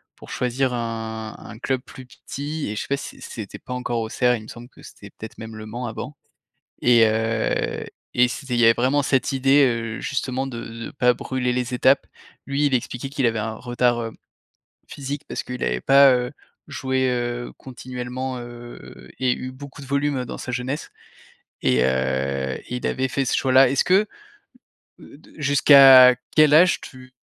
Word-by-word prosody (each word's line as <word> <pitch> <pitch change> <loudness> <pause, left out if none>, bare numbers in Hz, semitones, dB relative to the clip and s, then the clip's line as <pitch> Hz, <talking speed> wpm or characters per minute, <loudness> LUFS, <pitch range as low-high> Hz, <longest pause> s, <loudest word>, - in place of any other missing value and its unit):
pour - - -14
choisir 125 +1 -1
un 110 -2 -5
un 110 - -11
club 130 -1 -1
plus 130 - -12
petit. 145 +2 -6
Et 105 - -4
je - - -3
sais - - -7
pas 140 - 0
si - - -9
c - - -9
c’était 110 -4 -8
pas 125 - -8
encore 125 -2 -2
Auxerre 125 +2 +1
il 110 - -8
me - - -13
semble 120 +2 -11
que - - -19
c'était, - - -13
peut-être, 110 - -11
même 110 0 -9
le 110 - -8
Mans 120 +3 -5
avant. 115 +6 -7 0.7
Et 120 -2 +5
heu, 110 +1 -1 0.3
et 125 0 +4
c'était 130 0 -5
il 120 - +1
y - - +5
avait 115 - +7
vraiment 135 +4 +1
cette 135 0 0
idée, 135 +2 +4
heu, 115 -2 -2
justement 130 -1 -2
de 120 -3 -6 0.3
de - - -7
pas 125 -2 +2
brûler 125 0 -2
les 125 0 -2
étapes. 130 +2 +3 0.4
Lui 140 +2 0
il 135 - +1
expliquait 125 +2 -3
qu'il 135 -2 0
avait 115 -1 0
un 110 +1 -3
retard, 120 0 0
heu, 115 -1 -5 0.8
physique 140 +1 -6
parce - - -4
qu'il 125 -1 -7
avait - - -1
pas, 135 -1 +6
heu, 125 0 -1 0.3
joué, 130 -1 -1
heu, 120 0 -3
continuellement, 125 0 -6
heu, 120 0 -11
et 130 -1 +1
eu 130 0 -5
beaucoup 140 +1 -11
de 135 - -10
volume, 140 -1 -1
dans - - -7
sa - - -6
jeunesse. 130 +5 -4 0.7
Et 65 0 +3
heu, 65 +1 -1
il 125 0 -4
avait 130 0 -1
fait 135 +2 -1
ce - - 0
choix-là. 130 -1 +4
Est-ce 135 - +2
que 195 +4 +3 0.9
heu 145 - -14
de - - -20
jusqu'à 135 -3 +8 0.2
quel 155 -1 +6
âge 175 +2 +5
tu 130 0 -13
125 Hz, 190 wpm, -22 LUFS, 115-135 Hz, 0.9 s, jusqu'à